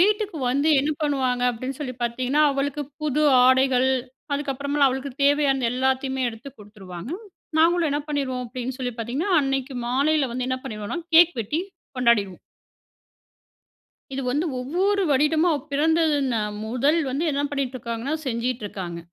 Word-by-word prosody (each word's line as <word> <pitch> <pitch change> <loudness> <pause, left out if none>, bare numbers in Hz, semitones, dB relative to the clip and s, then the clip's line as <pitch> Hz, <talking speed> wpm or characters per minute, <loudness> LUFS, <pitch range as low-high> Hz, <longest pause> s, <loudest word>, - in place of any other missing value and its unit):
வீட்டுக்கு 415 -1 +2
வந்து 280 +4 +1
என்ன 290 +3 0
பண்ணுவாங்க 260 -4 0
அப்பிடின்னு 255 +4 -6
சொல்லி 255 -4 -4
பார்த்தீங்கன்னா, 255 +5 +1
அவளுக்கு 280 +1 -2 0.2
புது 300 0 +1 0.2
ஆடைகள், 260 0 +4 0.5
அதுக்கு 285 -1 -2
அப்புறமலாம் 280 +1 +2
அவளுக்கு 265 +1 -4
தேவையான 280 -3 +3
எல்லாத்தையுமே 265 +1 0
எடுத்து 225 +4 -10
கொடுத்துருவாங்க. 200 - -10 0.5
நாங்களும் 335 -1 +3
என்ன 290 - 0
பண்ணிருவோம் 265 -4 -2
அப்பிடின்னு 255 +2 -5
சொல்லி 250 -2 -3
பார்த்தீங்கன்னா, 260 - -2
அன்னக்கி 270 -1 -2
மாலையில 280 +1 +2
வந்து 250 +1 -3
என்ன 255 0 -1
பண்ணிருவோன்னா 210 +8 -5 0.2
கேக் 345 +1 +7
வெட்டி 295 +10 -2 0.4
கொண்டாடிடுவோம். 220 -7 +2 1.7
இது 270 - -3
வந்து 295 +7 0
ஒவ்வொரு 370 +10 0
வருடமும் 305 +5 +3
அவ 300 - 0
பிறந்ததுன 295 -4 +2 0.3
முதல் 255 +8 +1
வந்து 280 +6 -1
என்ன 280 +1 0
பண்ணிட்டு 270 -3 -2
இருக்காங்கன்னா, 235 +4 -3
செஞ்டிட்டு 235 -1 -2
இருக்காங்க. 175 -4 -6
265 Hz, 140 wpm, -24 LUFS, 250-295 Hz, 1.7 s, கேக்